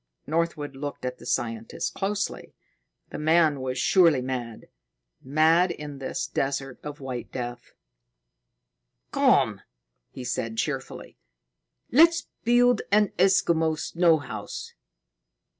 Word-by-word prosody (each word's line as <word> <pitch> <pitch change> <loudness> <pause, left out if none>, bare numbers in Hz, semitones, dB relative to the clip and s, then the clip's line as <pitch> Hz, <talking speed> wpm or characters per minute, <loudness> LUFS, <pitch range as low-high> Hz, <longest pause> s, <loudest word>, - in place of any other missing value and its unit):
Northwood 155 -3 -2
looked 140 -1 -6
at 125 0 -4
the 120 - -11
scientist 115 -3 -2
closely. 200 +1 -3 0.6
The - - -5
man 155 -2 +3
was 130 0 -3
surely 170 -7 +4
mad 125 -3 -5 0.6
mad 160 +6 +3
in 150 -4 -7
this 135 - -3
desert 135 -1 -3
of 150 0 -8
white 130 -3 -6
death. 120 -1 -6 1.4
"Come!" - - +3 0.5
he 130 - -9
said 115 -2 -3
cheerfully. - - -4 0.7
"Let's 330 +5 +5 0.2
build 245 0 +4
an 210 -1 +4
Eskimo 165 -4 +3
snow 170 0 +3
house. 145 - -7
150 Hz, 110 wpm, -26 LUFS, 130-175 Hz, 1.4 s, Let's